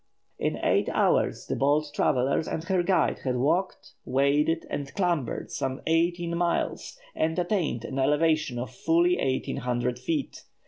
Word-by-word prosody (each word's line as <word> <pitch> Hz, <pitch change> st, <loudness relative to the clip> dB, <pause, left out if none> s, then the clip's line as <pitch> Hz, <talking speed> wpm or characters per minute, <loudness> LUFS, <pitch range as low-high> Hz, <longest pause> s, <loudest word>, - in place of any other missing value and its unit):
In -, -, -1 dB
eight -, -, +2 dB
hours -, -, +1 dB
the -, -, -2 dB
bold 145 Hz, +2 st, +1 dB
traveller 130 Hz, -1 st, +2 dB
and 160 Hz, -, -3 dB
her 185 Hz, +1 st, +1 dB
guide 185 Hz, +1 st, +1 dB
had 130 Hz, -2 st, -2 dB
walked, 165 Hz, +9 st, 0 dB
waded, 145 Hz, +5 st, +1 dB
and 140 Hz, -1 st, -4 dB
clambered 175 Hz, -, -1 dB
some 130 Hz, 0 st, -3 dB
eighteen 170 Hz, +1 st, +1 dB
miles, 170 Hz, -, -1 dB, 0.2 s
and 160 Hz, +2 st, -1 dB
attained 175 Hz, -, -1 dB
an 135 Hz, -, -4 dB
elevation 150 Hz, -1 st, +2 dB
of 120 Hz, -1 st, -4 dB
fully 170 Hz, +6 st, +2 dB
eighteen 130 Hz, -1 st, -1 dB
hundred 125 Hz, 0 st, -1 dB
feet. 145 Hz, +3 st, -3 dB
150 Hz, 145 wpm, -27 LUFS, 130-170 Hz, 0.2 s, eight